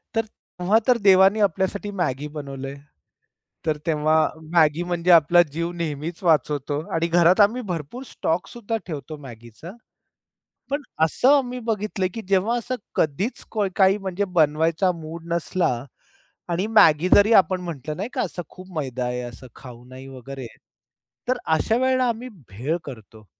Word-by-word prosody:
तर 225 0 +1 0.3
तेव्हा 185 +5 +3
तर 250 -1 +5
देवाने 195 0 +5
आपल्यासाठी 195 +3 -3
मॅगी 150 -7 -2
बनवलंय, 140 -2 -7 0.9
तर 155 -1 0
तेव्हा 155 -1 +1 0.4
मॅगी 160 0 +3
म्हणजे 175 0 0
आपला 170 +1 +6
जीव 170 +3 -3
नेहमीच 165 -1 -5
वाचवतो 150 -3 +1 0.2
आणि 165 +1 +1
घरात 175 +3 +4
आम्ही 220 +5 +3
भरपूर 170 - -5
स्टॉकसुद्धा 220 +7 -3
ठेवतो 155 -2 -6
मॅगीचा, 120 +5 -11 1.0
पण 285 +2 -1 0.2
असं 255 - +4
आम्ही 250 -2 -3
बघितलं, 210 -2 -1
की 225 - -5
जेव्हा 200 +5 +2
असं 240 +2 -3 0.2
कधीच 175 - -1 0.3
काही 195 0 +4
म्हणजे 195 0 -2
बनवायचा 160 +4 +3
मूड 160 +1 -8
नसला 170 -2 0 0.8
आणि 180 +4 0
मॅगी 175 -6 +5
जरी 205 +3 +5
आपण 185 -2 +4
म्हंटलं, 155 -4 -6
नाही 200 +6 -4
का - - -1
असं 180 -1 -4
खूप 185 +1 -13
मैदा 130 -3 -3
आहे, 125 0 -3
असं 120 +1 -9
खाऊ 125 -2 -12
नाही 130 +1 -11
वगैरे, 135 -1 -8 0.8
तर 255 - +1
अशा 160 +8 +1
वेळेला 255 0 +2
आम्ही 235 +2 -4 0.2
भेळ 125 - -2
करतो. 110 -4 -11
170 Hz, 145 wpm, -23 LUFS, 145-200 Hz, 1.0 s, आपला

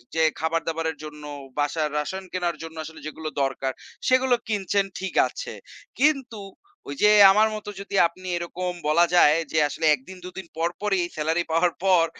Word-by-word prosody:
যে 160 - +2 0.2
খাবার-দাবারের 160 0 -1
জন্য 150 -1 -9 0.4
বাসায় 150 +1 0
রাসন 190 +6 -3
কেনার 175 -3 -1
জন্য 160 0 -9
আসলে 160 0 -10
যেগুলো 155 0 -6
দরকার। 135 0 -1 0.4
সেগুলো 255 -1 +4
কিনছেন 200 -2 0
ঠিক 190 0 -4
আছে। - - -7 0.5
কিন্তু 265 -7 +1 0.5
ওই 140 - -4
যে, 210 - +7 0.2
আমার 215 +2 +4
মত 210 - -8
যদি 200 0 -6
আপনি 185 +2 -13
এরকম 180 +1 -4 0.2
বলা 170 +3 +5
যায় 155 -2 +6
যে 160 - -1
আসলে 160 +3 -3
১ 150 -3 +4
দিন 190 - -9
২ - - -5
দিন 190 - -7
পর, 165 +1 +1
পরই 200 -3 +1 0.2
সেলারি 160 +3 0
পাওয়ার 165 +2 +2
পর 180 -3 +5
170 Hz, 170 wpm, -24 LUFS, 160-195 Hz, 0.5 s, যে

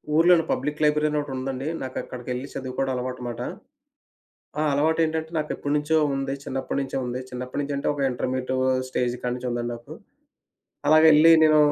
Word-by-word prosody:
ఊర్లోనే 170 0 +5
public 150 +3 -2
library 150 0 +3
అని 150 - 0
ఒకటుందండి. 135 0 -4
నాకక్కడికెళ్ళి 125 0 -5
చదువుకోవడం 130 0 -3
అలవాటుమాట. 125 -1 -4 1.2
ఆ! - - +2
అలవాటేంటంటే 160 +2 +1
నాకెప్పటినుంచో 150 +1 0 0.2
ఉంది. 135 0 -2
చిన్నప్పడ్నుంచే 135 +1 -3
ఉంది. 125 +1 -3
చిన్నప్పడ్నించి 130 +3 -4
అంటే 140 - -1
ఒక 145 - -3
ఇంటర్మీడియట్ 130 +1 -2 0.3
స్టేజ్ 125 -1 -1
కాడ్నుంచి 125 0 -3
ఉందాడి 120 0 -2
నాకు. 120 0 -10 0.9
అలాగెళ్ళి 155 +1 +7
నేను 155 -1 +5
135 Hz, 125 wpm, -25 LUFS, 125-150 Hz, 1.2 s, అలాగెళ్ళి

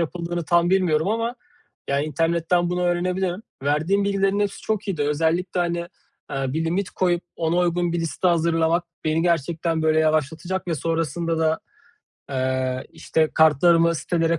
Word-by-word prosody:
yapıldığını 170 0 -3
tam 170 +3 +3
bilmiyorum 180 -3 +2
ama; 230 +2 -1 0.5
ya, 140 0 +1
internetten 165 +3 0
bunu 180 0 -1
öğrenebilirim. 180 +2 0 0.2
Verdiğin 160 +8 +1
bilgilerin 195 0 +1
hepsi 205 -1 -1
çok 215 -1 -2
iyiydi. 170 -7 -1
Özellikle, 165 +5 0
hani, 170 0 0 0.5
eee, 135 -1 -2
bir 160 +3 -1
limit 180 +4 -1
koyup 175 -2 0
ona 165 +1 0
uygun 175 -1 +1
bir 170 - -1
liste 165 +2 0
hazırlamak 165 0 +2 0.2
beni 155 +1 +1
gerçekten, 165 -1 0
böyle, 155 0 +3
yavaşlatacak 160 +4 -1
ve 165 - +1
sonrasında 165 +1 -1
da, 160 0 +1 0.7
eee, 130 -1 -1
işte, 155 -1 0
kartlarımı 165 +2 +5
sitelere 165 0 0
170 Hz, 145 wpm, -23 LUFS, 160-180 Hz, 0.7 s, kartlarımı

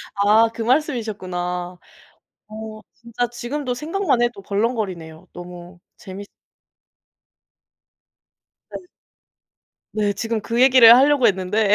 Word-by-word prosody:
아 210 +3 +3
그 230 - -7
말씀이셨구나. 190 - -2 0.7
어 215 0 -9
진짜 235 +1 -4
지금도 250 +2 -4
생각만 310 -2 -1
해도 240 -4 -2
벌렁거리네요. 195 -6 -4
너무 175 0 -11 0.2
재밌 200 0 -10 2.5
네. - - -10 1.1
네. 205 -1 -1
지금 225 +1 -3
그 235 +4 -1
얘기를 255 -3 +8
하려고 280 -1 +4
했는데 200 +2 +1
220 Hz, 220 characters per minute, -20 LUFS, 190-240 Hz, 2.5 s, 얘기를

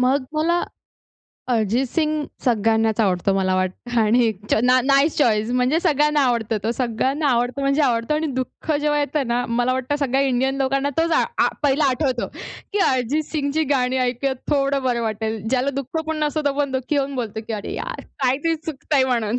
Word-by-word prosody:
मग 260 +2 +2
मला 340 +3 +1 0.9
अरिजित 230 +2 +1
सिंग 305 +1 0 0.2
सगळ्यांनाच 225 -2 +2
आवडतो 195 -2 +1
मला 190 -1 +1
वाटतं 185 +6 -2
आणि 220 +3 +3
एकच 210 -2 -3
ना 255 +1 +4
नाईस 275 +3 +3
चॉइस 220 -4 +2
म्हणजे 255 +5 +2
सगळ्यांना 300 -3 +2
आवडतो 230 -3 0
तो, 225 - +1
सगळ्यांना 260 +5 -1
आवडतो 245 +2 0
म्हणजे 275 +2 +2
आवडतं 235 +2 +1
आणि 315 +1 0
दुःख 260 +3 -4
जेव्हा 295 0 +1
येतं 285 -1 -1
ना, 245 +1 0
मला 240 +2 +1
वाटतं 260 +3 -1
सगळ्या 270 -1 +1
इंडियन 265 0 +1
लोकांना 275 +1 0
तोच 330 +1 +2
आ - - +4 0.2
आ - - +3
पहिला 285 +1 +2
आठवतो, 255 -2 -1 0.5
की 415 - 0
अरिजित 260 +4 +1
सिंगची 300 0 0
गाणी 255 -1 +1
ऐकुयात 255 +2 -1
थोडं 275 -1 +1
बरं 245 -2 0
वाटेल. 220 0 -2
ज्याला 260 +2 +1
दुःख 275 +4 -3
पण 315 - -2
नसतो, 305 +1 -1
तो 285 - +2
आपण 285 -1 0
दुःखी 260 +3 -1
होऊन 275 0 -1
बोलतो, 225 -4 -4
की - - -3
अरे 210 -2 -4
यार, - - -5 0.2
काहीतरी 280 +6 +1
चुकतंय 295 -3 -1
म्हणून. 235 -2 0
260 Hz, 185 wpm, -21 LUFS, 235-285 Hz, 0.9 s, ना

